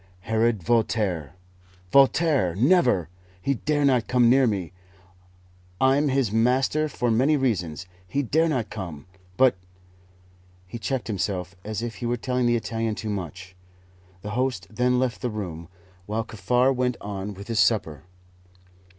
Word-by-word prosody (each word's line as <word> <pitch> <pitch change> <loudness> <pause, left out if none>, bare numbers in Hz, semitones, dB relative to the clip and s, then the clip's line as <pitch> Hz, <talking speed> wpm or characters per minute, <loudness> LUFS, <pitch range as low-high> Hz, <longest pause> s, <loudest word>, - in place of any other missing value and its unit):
"Herod 110 -1 0
Voltaire!" 100 - 0 0.6
"Voltaire! 140 - +4
Never! 125 - +3 0.3
He 140 +9 0
dare 145 +3 0
not 125 -4 +2
come 120 -2 +4
near 130 0 +5
me; 95 -6 -2 1.1
I'm 135 +3 +3
his 135 -6 +1
master 130 +7 +2
for 125 -4 -1
many 135 +7 +3
reasons 90 - -1 0.2
he 140 +10 -1
dare 160 +6 +2
not 125 -8 -2
come! 85 -9 -7 0.3
But 130 -6 +4 0.6
" 90 0 -31
He 120 - -7
checked 130 +2 -2
himself, 95 -3 -3
as 110 +1 -4
if 120 -1 -5
he 120 - -4
were 120 +1 0
telling 125 +1 0
the 120 - +3
Italian 115 -1 -2
too 110 0 -4
much. 95 -1 -6 0.7
The 105 - -5
host 120 -4 -1
then 125 +3 +1
left 125 -1 -1
the 125 - -1
room, 90 -7 -6 0.4
while 110 +2 -1
Kaffar 125 +5 +1
went 125 -1 -1
on 100 0 -5
with 100 +2 -10
his 115 -2 -1
supper. 80 - +1
115 Hz, 150 wpm, -25 LUFS, 95-130 Hz, 1.1 s, near